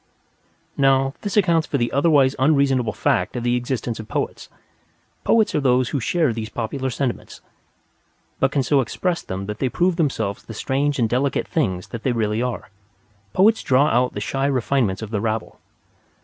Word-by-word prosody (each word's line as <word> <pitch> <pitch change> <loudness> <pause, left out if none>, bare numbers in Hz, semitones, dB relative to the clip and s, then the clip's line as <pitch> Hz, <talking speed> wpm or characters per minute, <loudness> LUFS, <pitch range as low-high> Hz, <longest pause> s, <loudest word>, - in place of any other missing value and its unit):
Now, 135 -1 +3
this 205 0 -3
accounts 170 -5 +3
for 140 - -1
the 120 -2 -1
otherwise 140 -2 +3
unreasonable 135 -4 +2
fact - - 0
of 120 - -3
the 120 0 +1
existence 120 -2 -3
of 110 - -8
Poets. - - -4 0.7
Poets 225 -2 +3
are - - +2
those 130 -3 +2
who 140 - -1
share 155 +1 +1
these 110 -1 -5
popular 130 +3 -3
sentiments, 125 0 -4 1.0
but 135 - +3
can 140 -2 +1
so 140 +2 +3
express 175 +7 -2
them 95 +1 -5
that 105 +1 -6
they 130 - 0
prove 175 +5 +1
themselves 115 - -1
the 115 - -10
strange 140 +5 0
and 120 -3 +2
delicate 130 +4 0
things 95 - -1
that 115 - -6
they 130 - 0
really 110 -1 0
are. 125 -6 -4 0.6
Poets 220 +4 +4
draw 140 +3 +3
out 125 +2 +1
the - - -2
shy 135 +5 -1
refinement 125 -7 0
of 110 - -7
the 105 -3 -1
rabble. 110 0 -3
130 Hz, 175 wpm, -22 LUFS, 115-140 Hz, 1.0 s, Poets